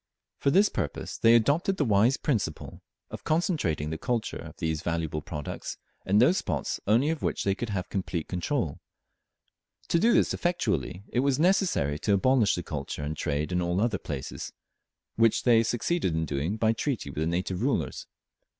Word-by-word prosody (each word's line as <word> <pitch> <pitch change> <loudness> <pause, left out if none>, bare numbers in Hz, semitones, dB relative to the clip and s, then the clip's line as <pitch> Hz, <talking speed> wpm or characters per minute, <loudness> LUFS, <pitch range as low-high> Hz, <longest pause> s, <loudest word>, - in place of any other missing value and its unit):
For - - +2
this 195 +8 +5
purpose - - -4
they 115 +1 +6
adopted 145 - +2
the 145 - +1
wise 110 +4 +3
principle 105 - -2 0.3
of - - -7
concentrating 155 - 0
the 80 - -4
culture 120 -3 -2
of - - -10
these 80 -2 -2
valuable 80 -3 -2
products 75 -1 -6 0.3
in 100 +2 +3
those 155 - +5
spots 75 -7 -2
only 120 +9 +3
of 160 - -4
which - - -1
they 100 - +2
could 115 +3 -5
have 95 -2 -2
complete 90 -4 -3
control. 90 - -2 1.1
To 170 - +3
do 230 +7 +4
this - - +3
effectually 100 - -1
it 125 - 0
was 135 0 +2
necessary 165 - +2
to 100 - +1
abolish 115 +2 +3
the 90 - -4
culture 75 -2 -5
and 75 +2 -3
trade 75 +2 -2
in 90 0 +1
all 85 +1 0
other 105 -2 +1
places, 70 -2 -6 0.7
which 115 -1 +3
they 115 -2 +5
succeeded 120 - 0
in 80 0 0
doing 75 +8 -2
by 110 0 +2
treaty 115 - -3
with 75 - -6
the 80 - 0
native 90 +2 -2
rulers. - - -1
100 Hz, 175 wpm, -27 LUFS, 80-130 Hz, 1.1 s, they